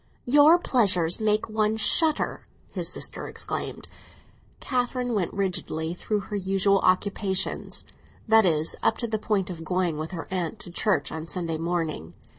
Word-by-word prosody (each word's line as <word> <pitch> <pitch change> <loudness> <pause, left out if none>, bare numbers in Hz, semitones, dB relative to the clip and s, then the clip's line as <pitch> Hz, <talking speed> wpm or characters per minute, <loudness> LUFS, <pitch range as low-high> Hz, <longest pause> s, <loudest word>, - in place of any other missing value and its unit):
"Your 295 +6 +7
pleasures 185 - +1
make 215 -1 +1
one 215 0 +1
shudder!" 310 +7 +1 0.2
his - - -3
sister - - -4
exclaimed. - - -5 0.7
Catherine 250 -1 -1
went 195 -6 0
rigidly 175 -4 -2
through 210 +3 -2
her 205 +1 -6
usual 195 0 +2
occupations; 190 +1 0 0.4
that 220 0 +6
is, 160 -4 +1
up - - +2
to 235 - -2
the 220 -1 -1
point 200 -3 0
of 165 -2 -7
going 175 -2 0
with 155 +1 -4
her 170 -3 -6
aunt 180 -4 -2
to 175 - -5
church 175 -5 0
on 160 0 -5
Sunday 165 -3 -3
morning. 160 - -2
190 Hz, 150 wpm, -26 LUFS, 170-220 Hz, 0.7 s, Your